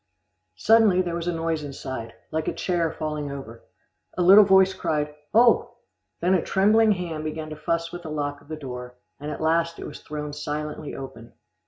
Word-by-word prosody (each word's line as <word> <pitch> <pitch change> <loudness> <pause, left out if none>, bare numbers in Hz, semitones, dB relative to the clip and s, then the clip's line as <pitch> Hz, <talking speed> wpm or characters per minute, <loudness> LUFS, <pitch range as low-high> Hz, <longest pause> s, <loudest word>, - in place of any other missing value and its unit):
Suddenly 210 - +4
there 175 -1 -3
was 170 0 -3
a - - +2
noise 165 -2 -2
inside, 130 -4 -6 0.2
like 160 0 -2
a - - -1
chair 170 -3 0
falling 150 -2 -4
over. 115 -5 -9 0.5
A 180 - +2
little 195 +4 +9
voice 190 -1 +5
cried, 150 -3 -2 0.2
"Oh!" 235 +1 +4 0.5
then 180 +2 +3
a 185 - +3
trembling 215 +3 +4
hand 170 -4 -4
began 155 0 -5
to - - -5
fuss 165 +2 -2
with 175 - -7
the 160 - -8
lock 145 -1 -3
of - - -21
the 155 - -5
door, 125 -4 -8 0.2
and 145 +1 -6
at 150 - -5
last 165 +1 +1
it - - -7
was 150 - -8
thrown 150 -1 -6
silently 150 0 -5
open. 115 -4 -9
155 Hz, 190 wpm, -25 LUFS, 150-175 Hz, 0.5 s, little